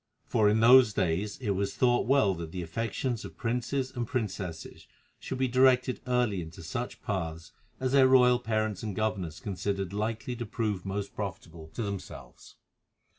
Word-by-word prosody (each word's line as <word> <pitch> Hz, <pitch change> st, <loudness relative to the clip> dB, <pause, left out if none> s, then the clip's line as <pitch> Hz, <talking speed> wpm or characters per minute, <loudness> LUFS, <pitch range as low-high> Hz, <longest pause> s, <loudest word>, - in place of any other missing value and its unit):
For 105 Hz, -1 st, +3 dB
in 110 Hz, +1 st, +2 dB
those 125 Hz, -1 st, +7 dB
days 95 Hz, +2 st, -1 dB
it 115 Hz, -6 st, -2 dB
was 100 Hz, +1 st, -1 dB
thought 120 Hz, -2 st, +2 dB
well 135 Hz, -7 st, +4 dB
that 85 Hz, -2 st, -6 dB
the 90 Hz, 0 st, -4 dB
affections 115 Hz, +6 st, -3 dB
of -, -, -10 dB
princes 125 Hz, +3 st, -1 dB
and 120 Hz, -2 st, -4 dB
princesses 100 Hz, -, -4 dB, 0.3 s
should 130 Hz, -, -5 dB
be 130 Hz, 0 st, +1 dB
directed 130 Hz, 0 st, +3 dB
early 120 Hz, -7 st, +1 dB
into 85 Hz, +2 st, -9 dB
such 120 Hz, +9 st, -5 dB
paths 85 Hz, -7 st, -4 dB, 0.3 s
as 130 Hz, -1 st, -1 dB
their 135 Hz, -1 st, +6 dB
royal 125 Hz, -1 st, +5 dB
parents 110 Hz, -4 st, -1 dB
and 105 Hz, -4 st, -4 dB
governors 95 Hz, -7 st, -2 dB
considered 100 Hz, -1 st, -3 dB
likely 110 Hz, +4 st, -2 dB
to 120 Hz, -, -4 dB
prove 105 Hz, -5 st, -2 dB
most 100 Hz, +1 st, -3 dB
profitable 90 Hz, -6 st, -6 dB
to 115 Hz, -, -2 dB
themselves. 100 Hz, -, -8 dB
110 Hz, 165 wpm, -29 LUFS, 95-125 Hz, 0.3 s, those